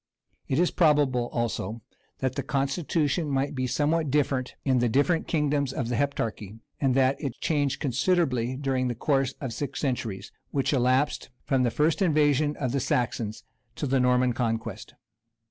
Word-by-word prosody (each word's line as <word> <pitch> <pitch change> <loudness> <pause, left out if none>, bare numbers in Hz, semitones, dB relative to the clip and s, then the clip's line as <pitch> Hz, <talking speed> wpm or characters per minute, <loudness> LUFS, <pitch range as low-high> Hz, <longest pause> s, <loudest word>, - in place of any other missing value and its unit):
It 130 - 0
is 175 +2 +3
probable, 145 -7 +3
also, 115 -1 -3 0.4
that 130 -1 0
the - - -2
constitution 150 +3 0
might 135 0 0
be 130 -2 -1
somewhat 150 +4 +1
different 135 -2 0
hi 135 - +2
the 120 -1 +2
different 145 +8 +2
kingdoms 145 -3 +1
of 125 -3 -3
the 120 - 0
Heptarchy, 110 -6 -2 0.2
and 135 -3 +2
that 135 0 +2
it 135 -5 -4
changed 145 -3 0
considerably 130 -3 +1
during 135 -2 0
the 120 - -2
course 135 +1 0
of 130 -4 -4
six 140 +3 -4
centuries, 120 -8 -3 0.2
which 140 +1 0
elapsed 130 +2 +1 0.2
from 135 -2 +2
the 125 - +3
first 155 - +1
invasion 150 -3 +2
of 130 -4 -1
the 140 - 0
Saxons 115 -4 -1 0.3
till 145 - -3
the 135 0 +3
Norman 125 0 +3
conquest. 115 -3 -3
135 Hz, 165 wpm, -27 LUFS, 125-145 Hz, 0.4 s, is